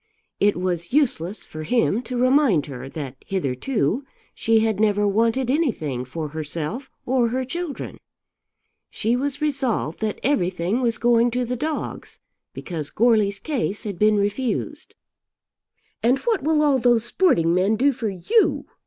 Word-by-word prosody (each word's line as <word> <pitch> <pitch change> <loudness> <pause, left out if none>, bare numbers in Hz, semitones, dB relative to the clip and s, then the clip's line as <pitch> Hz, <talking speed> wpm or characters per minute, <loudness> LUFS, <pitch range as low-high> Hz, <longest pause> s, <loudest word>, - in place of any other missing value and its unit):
It 205 -2 +3
was 175 -2 -2
useless 225 - 0
for 155 - -8
him 230 +5 +1
to 250 - -2
remind 255 - +3
her 135 -2 -8
that 135 -3 -6
hitherto 190 - -1 0.3
she 225 -1 +2
had 220 -2 0
never 205 -1 +2
wanted 230 +5 +1
anything 160 - -1
for 150 +4 -5
herself 160 - -5 0.2
or 250 -1 +2
her 255 +3 -2
children. 340 +2 -5 0.9
She 230 +2 0
was 285 +3 -2
resolved 260 - -1
that 215 -2 -2
everything 190 -3 0
was 235 -2 +1
going 240 0 +3
to 250 +1 -1
the 250 +1 -2
dogs 305 +5 -4 0.3
because 160 -5 -5
Goarly's 215 -3 +2
case 235 -7 -3
had 200 -6 -5
been 215 0 +4
refused. 205 +5 -2 1.1
"And 245 +3 +3
what 445 - 0
will 305 +1 +2
all 280 -3 +3
those 240 -2 +3
sporting 235 - +2
men 190 +4 +2
do 275 +5 +3
for 230 -3 -3
you?" 410 - +1
225 Hz, 145 wpm, -23 LUFS, 180-260 Hz, 1.1 s, been